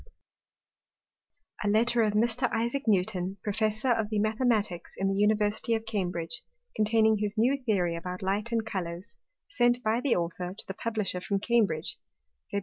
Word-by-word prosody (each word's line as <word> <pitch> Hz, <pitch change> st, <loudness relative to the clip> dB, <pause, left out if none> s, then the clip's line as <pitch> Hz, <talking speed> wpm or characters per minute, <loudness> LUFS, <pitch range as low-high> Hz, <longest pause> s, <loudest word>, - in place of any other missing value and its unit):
97_] 205 Hz, -, +1 dB
_A -, -, +2 dB
Letter 235 Hz, +2 st, +3 dB
of 215 Hz, -2 st, +2 dB
Mr. 235 Hz, +3 st, +2 dB
Isaac 235 Hz, +4 st, -1 dB
Newton, 190 Hz, -2 st, +1 dB
Professor 215 Hz, +4 st, 0 dB
of 225 Hz, -3 st, +1 dB
the 215 Hz, -, -1 dB
Mathematicks 215 Hz, -4 st, 0 dB
in 195 Hz, 0 st, 0 dB
the 195 Hz, -, -1 dB
University 210 Hz, +2 st, +2 dB
of 220 Hz, 0 st, -4 dB
Cambridge; 190 Hz, -1 st, -3 dB, 0.3 s
containing 220 Hz, 0 st, +3 dB
his 210 Hz, +1 st, -2 dB
New 260 Hz, +5 st, +2 dB
Theory 180 Hz, -7 st, +1 dB
about 180 Hz, +2 st, -6 dB
Light 205 Hz, +4 st, -1 dB
and 225 Hz, -1 st, 0 dB
Colours: 175 Hz, -3 st, -5 dB, 0.3 s
Sent 245 Hz, -11 st, +2 dB
by 220 Hz, +2 st, +1 dB
the 255 Hz, -2 st, +2 dB
Author 175 Hz, +2 st, -3 dB
to -, -, -7 dB
the 190 Hz, -, -4 dB
Publisher 210 Hz, -4 st, -2 dB
from 200 Hz, +2 st, -1 dB
Cambridge, 210 Hz, -8 st, 0 dB, 0.5 s
Feb. 200 Hz, -, 0 dB
215 Hz, 160 wpm, -28 LUFS, 195-230 Hz, 0.5 s, Letter